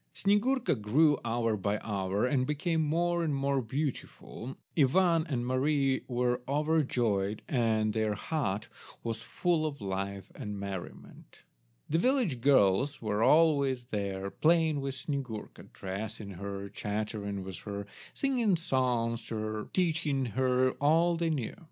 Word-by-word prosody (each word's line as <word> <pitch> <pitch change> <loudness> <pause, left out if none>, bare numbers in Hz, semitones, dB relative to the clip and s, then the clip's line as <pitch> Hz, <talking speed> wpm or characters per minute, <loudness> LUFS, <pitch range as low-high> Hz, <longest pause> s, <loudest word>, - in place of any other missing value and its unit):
Snyegurka 230 +6 +2
grew 145 +7 +4
hour 115 -1 0
by 100 +1 -1
hour, 100 0 -1
and 130 0 +1
became 160 +2 0
more 170 +3 +1
and 150 -3 0
more 140 0 +1
beautiful. 130 -1 -5 0.2
Ivan 165 +3 +3
and 120 -4 -1
Mary 135 +1 +1
were 125 -1 0
overjoyed, 125 -9 +1
and 110 -4 +1
their 110 -1 0
hut 110 -5 -2 0.4
was 115 -1 -3
full 170 +5 0
of 145 -2 -6
life 100 -1 -4
and 105 -1 -6
merriment. 100 -2 -8 0.4
The 160 - +1
village 235 - +1
girls 130 +1 +4
were 105 -1 -1
always 140 -4 +4
there 100 -4 -3
playing 160 -2 +3
with 135 -1 -3
Snyegurka, 130 -7 -5
dressing 100 +2 -6
her, 100 +1 -5
chattering 105 -1 -3
with 95 -2 -7
her, 100 -1 -5 0.3
singing 245 -8 +2
songs 125 -7 0
to 115 - -5
her, 110 0 -3
teaching 155 -6 +1
her 130 +2 +2
all 165 +4 +4
they 165 0 0
knew. 140 -8 -2
130 Hz, 135 wpm, -30 LUFS, 105-155 Hz, 0.4 s, grew